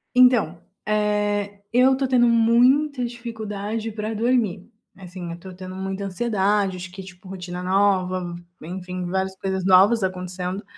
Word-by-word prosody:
Então, 240 -10 +4 0.2
eh 205 -1 0
eu 255 +2 +5
estou 265 0 0
tendo 250 -2 +4
muita 245 +4 +3
dificuldade 225 -2 -5
para 215 +1 -4
dormir, 225 -5 0 0.3
assim, 180 -2 -8
eu 170 - -5
estou 185 +2 -11
tendo 185 0 -9
muita 190 +1 -4
ansiedade, 200 -1 0
acho 180 0 -8
que 190 +1 -9
tipo 185 0 -14
rotina 180 -1 -6
nova, 185 -2 +1 0.3
enfim, 180 +1 -5
várias 190 +1 -2
coisas 190 -1 -2
novas 195 +4 +6
acontecendo, 185 +1 -3
195 Hz, 140 wpm, -23 LUFS, 185-225 Hz, 0.3 s, novas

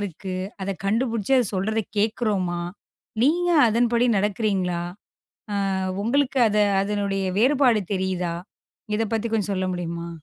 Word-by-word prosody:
இருக்கு? 190 -1 -5 0.3
அதைக் 195 0 -4
கண்டுபிடிச்சு 230 +2 0
அது 245 - +2
சொல்றதை 215 +4 0 0.2
கேக்குறோமா? 205 -5 0 0.6
நீங்க 350 +6 +3 0.2
அதன்படி 235 +2 +2
நடக்கிறீங்களா? 195 -3 0 0.7
அ - - -1 0.5
உங்களுக்கு 270 +4 +1
அத 210 0 0 0.2
அதனுடைய 200 -1 -1
வேறுபாடு 250 -2 +4
தெரியுதா? 185 -2 -1 0.6
இதைப் 225 0 -2
பத்தி 225 +1 -1
கொஞ்சம் 210 -2 0
சொல்ல 185 -1 -1
முடியுமா? 170 -1 -4
210 Hz, 115 wpm, -24 LUFS, 190-230 Hz, 0.7 s, வேறுபாடு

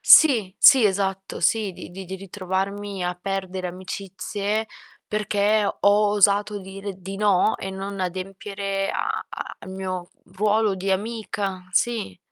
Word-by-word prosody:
Sì, 230 - +7
sì 265 -4 +8
esatto, 195 -1 0
sì, 205 +3 +2
di 175 - -10
di 190 +2 -8
di 190 - -5
ritrovarmi 195 +1 -3
a 180 0 -1
perdere 190 -1 -3
amicizie 195 +3 -3 0.4
perché 210 0 +1
ho - - -3 0.3
osato 205 0 +3
dire 195 +1 -7
di 190 +1 -7
no 205 0 +3
e 190 - -4
non 195 +1 -5
adempiere 195 +2 -3
a - - -2
a - - -7
al 190 - -9
mio 185 -1 -4 0.2
ruolo 210 +1 +2
di 190 +1 -2
amica, 200 -2 -2
sì. 220 - 0
195 Hz, 135 wpm, -24 LUFS, 190-205 Hz, 0.4 s, sì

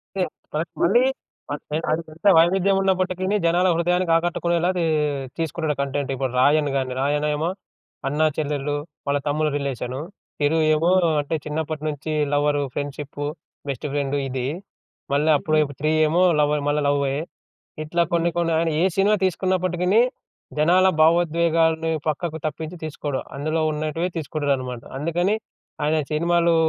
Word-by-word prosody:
అంటే, 190 - +1 0.3
మనకు 160 +2 -3
మళ్ళీ 200 +8 +5 0.9
అది 160 - +1
ఎంత 165 +5 -18
వైవిధ్యం 190 +4 +4
ఉన్నప్పటికీని 185 0 0
జనాల 175 +2 +3
హృదయానికి 175 +1 +1
ఆకట్టుకునేలాదీ 175 +1 0 0.5
తీసుకుంటాడు 160 -2 -1
కంటెంట్. 140 0 -2
ఇప్పుడు 130 -1 -2
'రాయన్' 145 +2 +4
గాని, 130 -1 -1
'రాయన్' 145 +2 +1
ఏమో 160 +4 -1 0.6
అన్నా, 150 +3 +1
చెల్లెలు, 145 -1 -1 0.3
వాళ్ళ 140 0 +2
తమ్ముడు 150 +1 +1
రిలేషను. 130 -2 -3 0.4
'తిరు' 150 +2 +2 0.2
ఏమో, 165 +3 +2 0.3
అంటే 145 +3 -3
చిన్నప్పటి 155 0 -3
నుంచి 155 +1 -3 0.2
లవరు, 145 0 +2
ఫ్రెండ్‌షిప్పు, 145 0 -5 0.4
బెస్టు 135 +2 -3
ఫ్రెండు 145 -1 0
ఇది. 130 -1 -3 0.7
మళ్ళా 150 +3 +3
అప్పుడే 155 +1 +1 0.2
'త్రీ' 155 +1 +2
ఏమో, 170 +4 +3 0.2
లవర 150 0 +2
మ - - -1
మళ్ళ 150 +1 +1
లవ్వే. 140 -1 +1 0.7
ఇట్లా 170 +3 +1
కొన్ని 170 0 +2
కొన్ని 170 -1 +1
ఆయన 165 0 +1
ఏ - - +4
సినిమా 200 +2 +4
తీసుకున్నప్పటికిని, 185 +2 +1 0.6
జనాల 180 +5 +5
భావోద్వేగాల్ని 165 0 +3 0.2
పక్కకు 155 +1 -2
తప్పించి 155 +3 -4
తీసుకోడు. 145 -3 -3 0.2
అందులో 155 +3 -1
ఉన్నటివే 155 +3 -2
తీసుకుంటాడన్నమాట. 140 -6 -2
అందుకని 175 +7 0 0.5
ఆయన 155 +2 +2
సినిమాలు 170 +2 +2
155 Hz, 130 wpm, -23 LUFS, 145-170 Hz, 0.9 s, మళ్ళీ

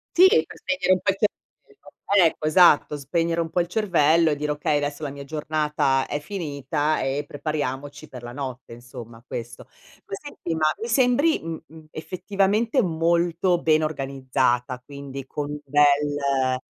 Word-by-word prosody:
Sì, 365 +2 +8
per 425 - +1
spegnere 275 -9 -1
un 185 - +4
po' 195 - +2
il 195 - -7
cervello 205 - -1
Ecco, 155 - -5
esatto. 155 -2 +5
Spegnere 165 +4 -1
un 165 -1 -1
po' 175 - +1
il 170 - -3
cervello 170 -5 +3
e - - 0
dire: 150 +1 -2
"Okay, 150 0 0
adesso 145 +1 -2
la 145 - -2
mia 140 0 -8
giornata 150 -2 0
è 145 - -3
finita 155 -3 -2
e 135 +2 -1
prepariamoci 145 0 -4
per 125 - -9
la 120 0 -8
notte." 130 -3 -7
Insomma 120 -1 -11
questo. 120 -1 -7 0.4
Poi 195 - -6
senti, 230 - -6
ma 155 -1 0 0.2
mi 230 - -3
sembri, 255 +6 +3
mhmm, 165 -1 -6
mhmm, 160 0 -14
effettivamente 200 - 0
molto 170 0 +1
ben 155 -1 +3
organizzata, 130 -4 -1
quindi 140 -1 -8
con 145 +1 -5
un 150 - -5
bel 145 -3 +2
150 Hz, 160 wpm, -24 LUFS, 140-175 Hz, 0.4 s, Sì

